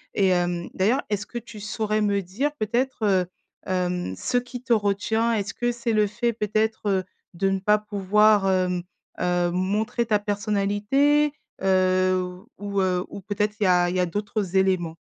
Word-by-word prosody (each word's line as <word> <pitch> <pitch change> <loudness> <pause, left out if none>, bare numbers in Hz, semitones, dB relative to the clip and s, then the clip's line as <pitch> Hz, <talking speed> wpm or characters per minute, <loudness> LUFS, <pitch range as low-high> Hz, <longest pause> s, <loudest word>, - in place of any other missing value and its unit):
Et 195 -2 +3
hem, 175 -1 0
d'ailleurs, 225 +9 +2
est-ce 205 0 -2
que 240 - -7
tu 230 -2 -9
saurais 215 0 -1
me 200 -1 +1
dire, 225 +12 -2
peut-être, 240 +1 -1
heu, 190 -3 +3 0.4
hem, 180 - -1
ce 245 - 0
qui 245 0 -4
te 245 -3 +2
retient? 220 +2 +1
Est-ce 205 -1 -2
que 240 0 -1
c'est 235 -1 -2
le 210 -1 +3
fait, 235 +3 -1
peut-être, 215 0 -1
heu, 190 -1 +1 0.3
de 195 +2 +1
ne 195 0 0
pas 210 +2 +3
pouvoir, 210 0 +3
hem, 180 -1 +1 0.4
heu, 175 -1 +1
montrer 210 +6 0
ta 210 -2 +3
personnalité, 210 +8 +1 0.3
heu, 185 -1 +2 0.2
ou 200 -1 -2
heu, 180 -1 0
ou 200 - -8
peut-être 210 +1 -2
il - - +1
y - - +4
a 175 -1 +4
il 180 - -3
y - - +1
a 180 - +3
d'autres 200 0 -3
éléments? 180 -4 +1
205 Hz, 180 wpm, -24 LUFS, 185-220 Hz, 0.4 s, y